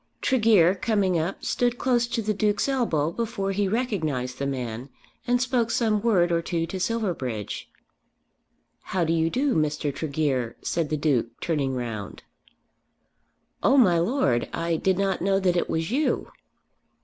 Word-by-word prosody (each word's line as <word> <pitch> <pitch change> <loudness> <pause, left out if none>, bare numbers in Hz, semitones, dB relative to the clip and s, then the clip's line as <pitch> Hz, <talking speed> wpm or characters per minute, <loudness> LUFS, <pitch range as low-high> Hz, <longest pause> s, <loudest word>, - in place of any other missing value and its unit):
Tregear 215 -9 +4
coming 195 -4 +1
up 170 +5 -3
stood 245 0 0
close 240 -2 +1
to 230 -1 -2
the 215 +1 0
Duke's 205 +1 +1
elbow 195 - 0
before 215 -1 -2
he 200 +1 0
recognised 160 - -2
the 140 - -1
man, 125 -1 -4 0.4
and 245 0 +3
spoke 245 -2 +1
some 220 -3 +1
word 190 -6 +3
or 170 0 +2
two 165 -1 -2
to 185 +3 -5
Silverbridge. 175 - -3 1.3
"How 175 - +3
do 165 0 +1
you 165 0 +2
do, 265 +6 +1
Mr. 150 -2 0
Tregear," 140 -5 -1
said 165 -3 -1
the 155 - 0
Duke, 130 -6 0
turning 140 -5 -1
round. 115 -5 -5 1.4
"Oh, 275 - +4
my 180 -10 +5
Lord, 170 - +1
I 170 0 -1
did 185 +3 +1
not 195 -1 0
know 195 +1 +2
that 185 -2 +1
it 175 - 0
was 160 +4 -1
you." 295 +5 0
175 Hz, 155 wpm, -25 LUFS, 150-225 Hz, 1.4 s, my